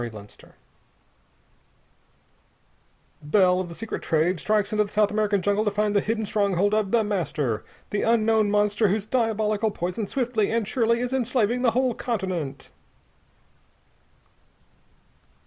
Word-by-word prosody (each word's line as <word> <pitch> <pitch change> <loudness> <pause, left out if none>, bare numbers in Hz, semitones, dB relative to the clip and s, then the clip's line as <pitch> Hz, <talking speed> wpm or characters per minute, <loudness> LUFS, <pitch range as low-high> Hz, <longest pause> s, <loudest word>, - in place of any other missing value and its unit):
_"] - - -2
[Sidenote: 105 -3 -11 2.7
Bell, 180 +4 +3
of 185 -2 -4
the 170 - -9
secret 225 +4 -5
"Trade," 165 +3 +1
strikes 210 +2 0
into 210 0 +2
the 205 - -10
South 210 -1 +2
American 210 -2 0
jungle 205 +2 +1
to 210 - +1
find 210 0 -1
the 200 - +4
hidden 220 +1 -2
stronghold 200 -1 +1
of 215 -2 +1
The 230 +1 +2
Master 155 - -2 0.3
the 205 - -1
unknown 220 -2 +2
monster 210 +1 +2
whose 200 +1 -1
diabolical 220 -2 0
poison 185 +2 -4
swiftly 240 -5 -1
and 225 -2 0
surely 235 +1 +1
is 250 +1 -3
enslaving 245 -2 0
the 250 - +4
whole 255 -2 +2
continent. 185 - -4
210 Hz, 135 wpm, -24 LUFS, 190-225 Hz, 2.7 s, the